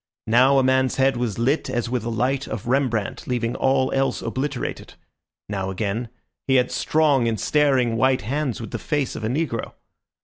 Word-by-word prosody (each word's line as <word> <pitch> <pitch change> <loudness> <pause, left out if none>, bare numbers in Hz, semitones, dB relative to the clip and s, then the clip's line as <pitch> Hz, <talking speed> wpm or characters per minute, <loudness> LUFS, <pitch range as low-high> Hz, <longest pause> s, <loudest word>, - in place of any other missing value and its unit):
Now 130 +5 +4
a 135 - +4
man's 130 0 +2
head 135 0 +2
was 120 -4 -2
lit 130 +5 0
as 120 -2 -1
with 120 -1 -2
a 120 - -3
light 130 +4 -1
of 105 - -5
Rembrandt, 120 -5 -1
leaving 120 -2 -1
all 130 0 +2
else 135 -1 0
obliterated; 130 +5 -4 0.5
now 95 -2 -3
again 105 +5 -3 0.4
he 135 - +3
had 125 -1 +3
strong 145 -6 +2
and 110 -2 -1
staring 135 -6 +2
white 130 +2 +2
hands 135 +2 -2
with 115 - -7
the - - -4
face 145 -4 -2
of - - -6
a - - 0
negro. 130 -3 -2
125 Hz, 180 wpm, -23 LUFS, 115-135 Hz, 0.5 s, Now